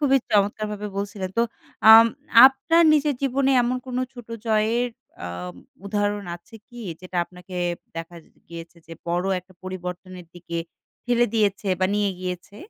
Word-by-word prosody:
খুবই 270 -2 +4
চমৎকারভাবে 210 0 0
বলছিলেন। 200 -2 -4
তো - - +5 0.5
আম 225 +1 +10 0.4
আপনার 330 +5 +3
নিজের 295 -1 +2
জীবনে 275 0 +1
এমন 245 +1 0
কোনো 255 0 -2
ছোটো 240 -2 -11
জয়ের 225 +3 +1 0.4
আ - - -4 0.6
উদাহরণ 205 0 -1
আছে 175 +6 -21
কি 240 0 -11 0.2
যেটা 185 0 -8
আপনাকে 180 +1 -13 0.4
দেখা 165 +1 -7 0.3
গিয়েছে 170 +1 -10
যে 165 - -11 0.2
বড়ো 175 +2 0
একটা 185 +1 -23
পরিবর্তনের 185 -1 -7
দিকে 170 -1 -6 0.5
ফেলে 240 0 +2
দিয়েছে 205 -2 +1
বা 185 - +4
নিয়ে 205 -1 +1
গিয়েছে? 180 +2 -6
205 Hz, 140 wpm, -23 LUFS, 180-240 Hz, 0.6 s, আম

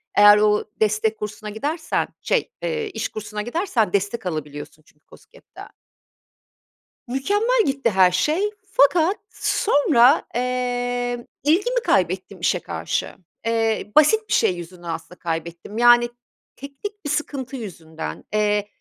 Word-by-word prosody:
Eğer 205 0 +8
o 210 0 +3 0.2
destek 215 0 +1
kursuna 210 0 -6
gidersen 300 +10 -2
şey, - - 0
eee, 455 -2 -2
iş 390 - -4
kursuna 210 0 -6
gidersen 240 - -1
destek 200 +3 -1
alabiliyorsun 155 -2 -6
çünkü 150 - -28
KOSGEB'den. - - -15 1.4
Mükemmel 410 - +1
gitti 270 -3 +1
her 185 -3 +4
şey 310 - +1 0.2
fakat 330 +6 +4
sonra, 285 - +3
eee, 245 -1 -2 0.2
ilgimi 405 +12 +2
kaybettim - - 0
işe - - +1
karşı. - - -3 0.3
Eee, 225 -2 0
basit 430 +9 +5
bir - - 0
şey 180 - +3
yüzünden 175 +1 -10
aslında 165 +2 -6
kaybettim, 170 +4 -5
yani 240 0 +6 0.5
teknik 295 +9 -9
bir - - -2
sıkıntı 275 -3 -3
yüzünden. 160 - -7
Eee, 210 -1 +1
235 Hz, 120 wpm, -22 LUFS, 205-290 Hz, 1.4 s, Eğer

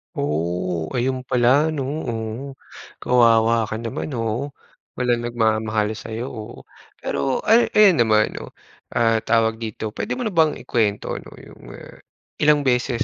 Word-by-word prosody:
Oo, 85 +2 -2
ayon 130 +1 0
pala 130 +4 +3
‘no. 140 - -2 0.2
Oo. 110 -1 -3 0.7
Kawawa 115 -2 +4
ka 110 - -4
naman, 120 +5 -5
oo. 115 +5 -3 0.4
Walang 120 -2 0
nagmamahal 110 -2 0
sa’yo, 115 +2 -6
oo. 110 -3 -9 0.4
Pero 135 -1 -1
ay 230 +2 +5
ayan 200 -6 +6
naman 110 -2 +3
'no, - - -9 0.4
ah, 115 -1 +3
tawag 115 0 +1
dito, 110 -1 -5
puwede - - -4
mo 255 - -4
na 220 - -2
bang 160 -3 +3
i-kwento 105 -4 -1
'no, - - -14
'yong, - - -15
ah, - - -13 0.4
ilang 150 -1 +4
beses 125 -2 +1
115 Hz, 145 wpm, -22 LUFS, 110-130 Hz, 0.7 s, ayan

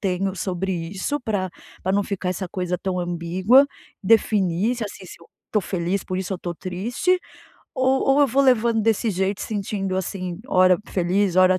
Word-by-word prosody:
tenho 190 -1 -1
sobre 190 +1 -2
isso 185 - -3
pra 205 -6 -2 0.3
pra 190 - 0
não 200 +1 +2
ficar 190 -2 -2
essa 185 0 -4
coisa 180 -1 -2
tão 185 -1 -2
ambígua? 180 +9 +3 0.4
Definir 205 0 +2
se, 230 - -3
assim, 195 -1 -8
se 170 - -12
eu 170 - -16 0.3
tô 210 - +3
feliz, 185 0 -2
por 185 - -3
isso 190 +1 -3
eu - - -6
tô 175 -1 -5
triste, 220 - -1 0.6
o 260 - +1 0.3
ou 285 - +4
eu 285 - +6
vou 270 +4 +2
levando 235 -3 +3
desse 225 +1 +2
jeito, 190 +1 -1
sentindo, 195 -2 -2
assim, 185 -1 -4
ora 185 -4 +5
feliz, 185 +1 +1
ora 185 0 +5
190 Hz, 180 wpm, -23 LUFS, 180-215 Hz, 0.6 s, eu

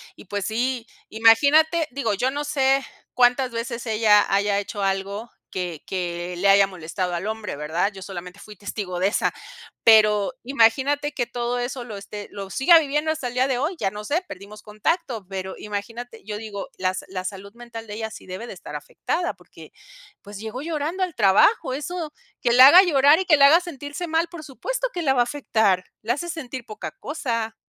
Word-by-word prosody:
y - - -14
pues 205 0 -3
sí 240 +2 -1 0.2
imagínate 290 +9 +4
digo 245 -5 -1
yo 250 +6 0
no 290 +2 -3
sé 270 -2 +2 0.3
cuántas 250 +1 +4
veces 235 +1 -4
ella 215 -2 +4
haya 200 0 +2
hecho 205 0 -5
algo 195 +4 -2 0.2
que 175 -4 -4
que 175 -1 -3
le 190 +3 +1
haya 195 0 +6
molestado 180 0 -4
al 175 +3 -4
hombre, 220 -4 -4
¿verdad? 160 +7 -1
Yo 190 -1 -9
solamente 180 0 -8
fui 210 +1 -12
testigo 200 -2 -5
de 185 - +3
esa, - - 0 0.5
pero 210 -1 +5
imagínate 275 +4 +2
que 245 - -1
todo 240 0 -2
eso 245 +1 -4
lo 220 -4 -8
esté 205 +1 -8
lo 195 -1 -7
siga 305 +6 +6
viviendo 300 +1 -1
hasta 310 -5 -3
el - - -9
día 255 +1 +3
de 260 -2 0
hoy, 305 +8 -1
ya 195 - +1
no 210 +1 -7
sé, 320 - 0
perdimos 200 +3 -10
contacto, 220 - -2
pero 190 -1 -5
imagínate, 225 +3 -6
yo 210 0 -4
digo 210 -2 -7
las 185 0 -1
la 185 -1 -5
salud 200 +1 -7
mental 235 -2 -9
de 205 - -7
ella 220 0 -4
sí - - -11
debe 185 +5 -6
de - - -7
estar 175 -5 -10
afectada, 325 - -3
porque - - -16 0.5
pues 205 0 -10
llegó 220 +4 -6
llorando 320 +3 -3
al 360 -4 -3
trabajo, 240 - +4
eso 310 +3 -5 0.3
que 240 - +3
la 255 +2 +10
haga 360 +5 +9
llorar 295 -2 +5
y 380 - -1
que 335 - +6
la 280 0 +8
haga 320 +4 +7
sentirse 305 -1 -6
mal 325 +1 +1
por 340 -3 -9
supuesto - - -3
que 350 - -3
la 270 -3 +3
va 245 - +4
a - - +6
afectar. 220 -8 +1 0.2
La 230 +3 +1
hace 345 +6 -5
sentir 260 -6 -6
poca 215 0 -7
cosa. 230 -7 -4
230 Hz, 200 wpm, -23 LUFS, 200-280 Hz, 0.5 s, la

